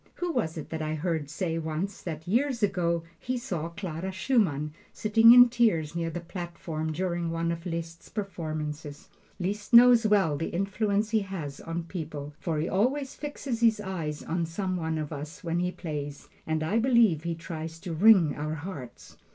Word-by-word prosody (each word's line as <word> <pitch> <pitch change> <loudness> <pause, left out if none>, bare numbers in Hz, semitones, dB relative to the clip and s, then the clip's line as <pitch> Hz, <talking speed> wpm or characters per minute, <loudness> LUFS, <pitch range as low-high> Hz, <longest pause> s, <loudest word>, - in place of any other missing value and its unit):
Who 355 -1 -2
was 165 - -1
it 155 - -7
that 160 -1 -3
I 155 0 -1
heard 160 -2 -2
say 165 +1 -2
once, 165 +5 -3
that 160 -1 -6
years 240 +3 +1
ago 170 -4 +1 0.2
he 255 +1 -2
saw 170 -8 -3
Clara 180 0 -5
Schumann 185 - +1 0.2
sitting 225 +2 +6
in 245 0 +10
tears 215 -11 +1
near 165 -1 -1
the 175 - -4
platform 170 -3 -5
during 175 0 -1
one 165 0 -1
of 170 +2 -5
Liszt's 165 0 -5
performances? 155 -7 -5 0.3
Liszt 205 +5 -3
knows 240 -1 +8
well 195 -8 +3
the 165 - -2
influence 200 +3 0
he 220 - +4
has 175 -9 -5
on 165 +1 -4
people, 155 -4 -6
for 165 -3 -2
he 155 +3 0
always 265 +9 0
fixes 285 -5 -4
his 230 -2 +4
eyes 170 -7 -4
on 170 0 -1
some 185 +2 -2
one 160 -2 -2
of 155 0 -4
us 150 +2 -7
when 170 0 -1
he 180 0 0
plays, 145 -5 -6 0.2
and 160 0 0
I 205 +9 +1
believe 230 - +4
he 170 0 -2
tries 165 -1 -6
to 175 -3 -5
wring 185 -2 +6
our 155 +1 -3
hearts. 145 -6 -9
170 Hz, 180 wpm, -28 LUFS, 160-205 Hz, 0.3 s, in